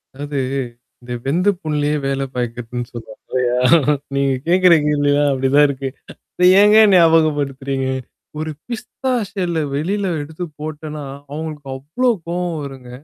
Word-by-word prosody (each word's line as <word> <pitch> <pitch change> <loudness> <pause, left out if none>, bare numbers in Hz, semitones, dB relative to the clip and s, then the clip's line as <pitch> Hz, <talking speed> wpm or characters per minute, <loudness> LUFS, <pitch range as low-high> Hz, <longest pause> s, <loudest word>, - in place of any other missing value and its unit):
அதாது, 145 0 -4 0.6
இந்த 125 0 -7
வெந்த 175 +8 +2
புண்ணுலயே 150 -1 0
வேல 135 0 -1
பாயிக்கிறதுன்னு 120 0 -4
சொல்லுவாங்க 110 -2 -10
இல்லையா? 125 -1 0 0.6
நீங்க 140 -1 +2
கேட்கிற 180 0 +5
கேள்விலாம், 145 -1 +2
அப்படிதான் 135 +2 +4
இருக்கு. 135 -1 -4 0.5
அத 180 - +2 0.2
ஏங்க 210 +1 +6 0.2
ஞாபகப்படுத்துறீங்க? 145 -5 +2 0.5
ஒரு 155 0 -3 0.2
பிஸ்தா 260 +3 -4 0.2
ஷெல்ல 180 -5 -2 0.2
வெளில 195 +7 -1 0.2
எடுத்து 160 +4 -6 0.2
போட்டோன்னா, 155 -1 -6 0.3
அவங்களுக்கு 150 -2 -6
அவ்ளோ 160 - 0 0.2
கோவம் 175 -1 -2
வருங்க. 130 -3 -9
145 Hz, 120 wpm, -19 LUFS, 135-165 Hz, 0.6 s, ஏங்க